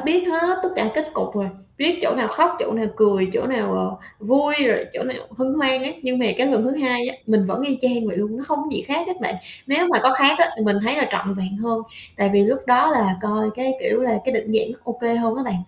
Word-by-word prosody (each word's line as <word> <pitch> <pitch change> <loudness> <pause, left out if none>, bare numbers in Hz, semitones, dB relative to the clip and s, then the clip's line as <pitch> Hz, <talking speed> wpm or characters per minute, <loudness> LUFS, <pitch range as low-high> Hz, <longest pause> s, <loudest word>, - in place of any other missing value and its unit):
biết 350 +6 +1
hết 340 +2 +1
tất 375 - +1
cả 225 - +1
kết 310 0 -2
cục - - -3
rồi, 200 -1 -2 0.3
biết 335 +4 +2
chỗ - - +2
nào - - 0
khóc, 335 +2 +3
chỗ - - -2
nào 225 -1 -1
cười, 200 -3 +3
chỗ - - -1
nào, 250 - -1
ờ, 95 0 -2 0.3
vui 285 +5 +3
rồi 225 - +2
chỗ - - -4
nào 255 +1 -4 0.2
hân 260 +1 0
hoan 265 -3 +2
á. 270 - -2
Nhưng 255 -1 -1
mà 245 - +2
cái 255 - +3
lần 245 -5 +2
thứ 255 - +1
2 250 -4 0
á, 255 - -6
mình 215 -3 +3
vẫn 225 +6 -2
y 270 -2 -1
chang 245 -3 +1
vậy 195 -4 -3
luôn, 210 +3 -2
nó 270 - -6
không 305 -1 -1
có 300 - -5
gì - - -2
khác 315 +5 -2
hết 370 -1 -5
bạn. - - -2 0.3
Nếu 295 +6 +2
mà 345 - +4
có 260 +1 +5
khác 275 +2 +5
á, 340 - +6
thì 220 - -2
mình 205 -1 +2
thấy 240 +5 +1
là 280 -3 +1
trọn 200 0 -1
vẹn 195 0 -4
hơn 225 +1 -2 0.3
tại 200 0 +2
vì 200 0 +5
lúc 250 +5 +2
đó 250 +5 +5
là 215 -10 +2
coi 215 0 0
cái 260 +2 -1
kiểu 235 - +1
là 235 -3 +1
cái 260 - 0
định 220 -1 -2
dạng 225 0 +1
nó 250 - -15
ô 240 0 -6
kê 235 0 +1
hơn 230 -1 0
á 275 - -2
bạn. 245 - -3
250 Hz, 285 wpm, -21 LUFS, 220-275 Hz, 0.3 s, á